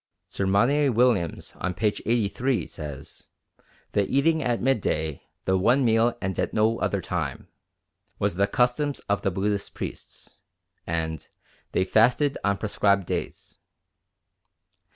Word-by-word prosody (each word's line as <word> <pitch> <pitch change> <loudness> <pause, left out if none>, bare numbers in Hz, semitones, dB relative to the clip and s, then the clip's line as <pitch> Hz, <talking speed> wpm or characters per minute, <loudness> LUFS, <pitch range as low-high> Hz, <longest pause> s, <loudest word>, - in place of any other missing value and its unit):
Sir 100 - -2
Monier 130 +9 +3
Williams 115 -8 +1
on 95 -1 -3
p. 110 - -2
83 115 +4 0
says, 75 -1 -9 0.6
"The 100 -1 +1
eating 155 +4 +2
at 120 -4 0
midday 80 - 0 0.2
the 95 0 +2
one 125 +7 +3
meal 115 +1 +3
and 95 -1 -3
at - - -1
no 110 +1 +2
other - - 0
time" - - -4 0.7
was - - 0
the 100 +3 +2
custom 125 +6 +1
of 100 0 +1
the 100 - +1
Buddhist 100 +2 -2
priests, - - -8 0.5
and 80 -2 -3 0.4
they - - +2
"fasted 125 +8 +3
on 100 -1 +1
prescribed 100 -2 +1
days." - - -5
105 Hz, 130 wpm, -25 LUFS, 95-125 Hz, 0.7 s, Monier